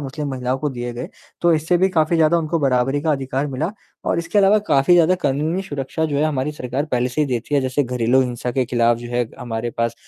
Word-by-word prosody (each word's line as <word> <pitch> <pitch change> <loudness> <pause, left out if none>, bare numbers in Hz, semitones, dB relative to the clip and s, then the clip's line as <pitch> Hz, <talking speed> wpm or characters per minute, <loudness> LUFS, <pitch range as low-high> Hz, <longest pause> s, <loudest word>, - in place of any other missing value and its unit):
मुस्लिम 145 +1 -5
महिलाओं 130 0 -2
को 150 - -1
दिए 120 -1 -5
गए। 120 +1 -6 0.3
तो 170 0 +4
इससे 160 +3 +1
भी 190 - +3
काफ़ी 160 +2 +3
ज़्यादा 165 +1 +4
उनको 165 +1 -1
बराबरी 135 0 +1
का 160 -1 +2
अधिकार 135 0 -2
मिला 145 +5 -2 0.3
और - - 0
इसके 170 +5 0
अलावा 200 +1 +5
काफ़ी 140 +5 +4
ज़्यादा 175 +1 +5
कानूनी 155 +7 0
सुरक्षा 145 -2 -3
जो 150 -3 -1
है 145 - +2
हमारी 150 -1 -1
सरकार 130 0 -3
पहले 125 0 +1
से 125 +5 -2
ही 150 - +2
देती 125 +2 -2
है, 140 - +4
जैसे 130 +2 0
घरेलू 125 +1 +2
हिंसा 125 -1 -2
के 130 +1 +1
ख़िलाफ़ 120 -1 +2
जो 120 0 -8
है 120 -1 +1
हमारे 120 0 -4
पास 115 0 0
135 Hz, 240 wpm, -20 LUFS, 125-155 Hz, 0.3 s, अलावा